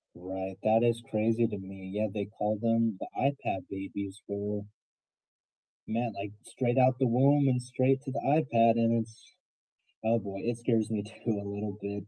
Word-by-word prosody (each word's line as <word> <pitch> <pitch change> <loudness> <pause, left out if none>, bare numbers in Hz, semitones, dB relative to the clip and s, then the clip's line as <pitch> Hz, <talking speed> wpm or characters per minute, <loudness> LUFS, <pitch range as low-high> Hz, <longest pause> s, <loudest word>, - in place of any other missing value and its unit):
Right. 95 +1 -6
That 110 +1 +4
is 115 -1 +2
crazy 115 +2 +2
to 105 -2 -5
me. 95 0 -9
Yeah, 105 +2 0
they 105 -2 -2
call 105 0 -2
them 115 -2 +2
the - - -5
iPad 140 -8 0
babies 95 +1 -6
for 100 0 -3 1.2
man, 115 0 -1
like 100 +1 -6
straight 125 0 -1
out 130 0 +5
the 130 -1 +3
womb 135 +3 +5
and 125 -1 +1
straight 130 +2 +1
to 135 - -5
the 140 - -2
iPad, 115 -6 +4
and 115 0 +3
it's 110 0 -13 0.7
oh 115 +1 +3
boy, 100 -2 -5
it 120 0 -1
scares 115 -2 +1
me 105 -2 -1
too 110 0 -3
a 100 - -7
little 100 0 -4
bit. 100 0 -5
110 Hz, 180 wpm, -30 LUFS, 100-120 Hz, 1.2 s, out